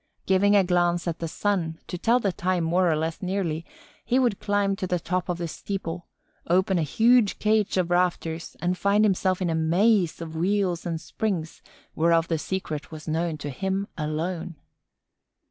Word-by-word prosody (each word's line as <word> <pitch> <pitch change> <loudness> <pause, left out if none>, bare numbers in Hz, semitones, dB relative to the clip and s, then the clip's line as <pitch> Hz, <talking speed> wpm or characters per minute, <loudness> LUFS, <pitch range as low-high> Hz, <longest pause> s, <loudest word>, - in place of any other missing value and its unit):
Giving 200 +2 +4
a 200 - +6
glance 175 -1 +1
at 170 -1 -2
the 165 - -3
sun, 170 -2 -1
to - - -6
tell 230 +7 +2
the 200 -5 0
time 180 0 -1
more 175 +2 +2
or - - +2
less 160 +4 -3
nearly, 180 -4 -2 0.4
he 250 - +1
would 245 -6 +2
climb 205 -1 +1
to 185 - -3
the 180 - +1
top 180 +2 -2
of 175 - -1
the 170 -1 -3
steeple, 175 0 -5 0.4
open 185 +1 +2
a - - +1
huge 225 - +3
cage 215 -2 +1
of 175 -1 0
rafters 175 -2 -1
and 175 +2 0
find 200 +4 +3
himself 185 -2 +1
in 175 - 0
a - - 0
maze 175 +3 +2
of 165 -1 -7
wheels 180 0 0
and 165 -1 -2
springs 170 -3 -3 0.3
whereof 165 +1 +2
the 165 -2 0
secret 155 -3 -4
was 155 0 -9
known 160 0 -1
to 145 -1 -5
him 190 +6 -2
alone. 165 +2 -3
180 Hz, 180 wpm, -25 LUFS, 165-195 Hz, 0.4 s, a